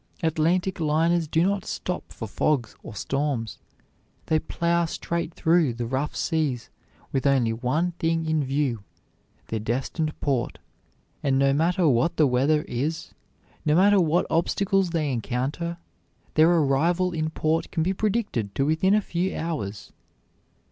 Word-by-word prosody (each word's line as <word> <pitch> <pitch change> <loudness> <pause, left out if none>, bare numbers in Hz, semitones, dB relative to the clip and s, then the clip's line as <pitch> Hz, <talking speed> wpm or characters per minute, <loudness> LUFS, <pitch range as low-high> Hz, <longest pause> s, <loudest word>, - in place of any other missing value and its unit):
Atlantic 165 +4 +1
liners 165 +2 +2
do 160 +2 +2
not 200 -1 0
stop 180 - -4
for 110 - -6
fogs 120 +1 0
or 105 - -10
storms; 135 -1 -2 0.7
they 155 - +2
plow 170 +2 0
straight 170 +1 -3
through 160 -7 +2
the 120 0 -3
rough 135 +5 -2
seas 140 -7 -1 0.4
with 135 0 0
only 125 -5 +3
one 135 +10 0
thing 165 0 0
in 160 -1 +1
view, 135 -5 -1 0.7
their 110 - -2
destined 135 +8 -2
port, 135 -5 -1 0.6
and 135 -2 +1
no 135 0 +3
matter 170 +4 +2
what 130 +4 +2
the 155 - +5
weather 140 +4 +2
is, 150 +7 -3 0.5
no 150 0 +2
matter 200 +2 +5
what 170 +1 +2
obstacles 195 +3 +1
they 155 -4 -1
encounter, 135 +8 -2 0.6
their 155 +2 +5
arrival 170 +3 +2
in 155 -2 -1
port 160 +1 -1
can 165 - -1
be 185 +3 +1
predicted 195 - -1
to 135 - +1
within 160 +6 +3
a 215 - +3
few 180 0 -2
hours. 145 -12 -4
155 Hz, 145 wpm, -25 LUFS, 135-170 Hz, 0.7 s, the